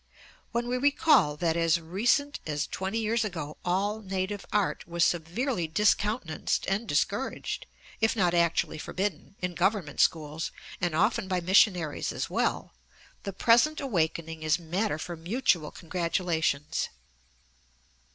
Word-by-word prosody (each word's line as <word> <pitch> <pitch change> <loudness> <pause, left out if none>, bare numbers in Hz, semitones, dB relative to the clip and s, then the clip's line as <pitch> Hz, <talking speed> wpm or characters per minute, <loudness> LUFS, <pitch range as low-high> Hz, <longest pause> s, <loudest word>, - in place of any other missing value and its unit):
When 235 +1 -1
we 250 +1 -1
recall 280 - +4
that 165 0 +1
as 165 0 +3
recent 230 - +1
as 150 -1 -1
twenty 190 +4 -3
years 225 +1 +1
ago 165 -8 -5
all 200 +4 0
native 195 0 -3
art 210 -2 0
was 170 0 +2
severely 175 - -1
discountenanced 205 -1 +1
and 200 +4 -1
discouraged, 205 - -1 0.3
if 225 +1 +2
not 180 -5 +2
actually 170 -2 +1
forbidden, 190 +1 -3
in 180 0 -1
Government 185 -4 0
schools, 155 0 +1 0.3
and 175 -3 0
often 210 +4 +2
by 185 -1 0
missionaries 180 -3 +3
as - - -4
well, - - -1 0.5
the 200 - -4
present 240 +10 +4
awakening 165 - -1
is 155 0 +2
matter 175 +3 -1
for 170 +2 -5
mutual 170 - 0
congratulations. 165 -4 -1
180 Hz, 130 wpm, -28 LUFS, 165-215 Hz, 0.5 s, recall